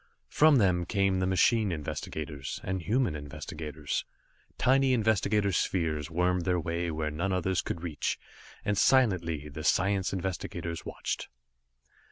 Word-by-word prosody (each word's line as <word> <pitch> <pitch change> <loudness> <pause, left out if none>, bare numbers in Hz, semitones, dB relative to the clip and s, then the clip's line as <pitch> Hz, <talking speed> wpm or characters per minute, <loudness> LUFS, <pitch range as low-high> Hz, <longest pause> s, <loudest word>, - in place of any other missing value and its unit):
From 155 -1 +5
them 90 -7 +3
came 100 -2 +1
the 95 - +1
machine 100 +3 +3
investigators, 75 -2 -5
and 95 0 -2
human 115 - +1
investigators. 75 0 -5 0.5
Tiny 130 +1 +4
investigator 105 -3 +2
spheres 80 -4 0
wormed 90 +1 +1
their 90 0 +1
way 85 +1 -2
where 75 -1 -2
none 85 +6 -2
others 95 -1 +1
could 85 - -5
reach, 80 -4 -2 0.5
and 105 - +1
silently 90 - +3
the 75 +2 -7
science 95 +3 +2
investigators 90 -3 -4
watched. - - -4
90 Hz, 130 wpm, -29 LUFS, 80-100 Hz, 0.5 s, From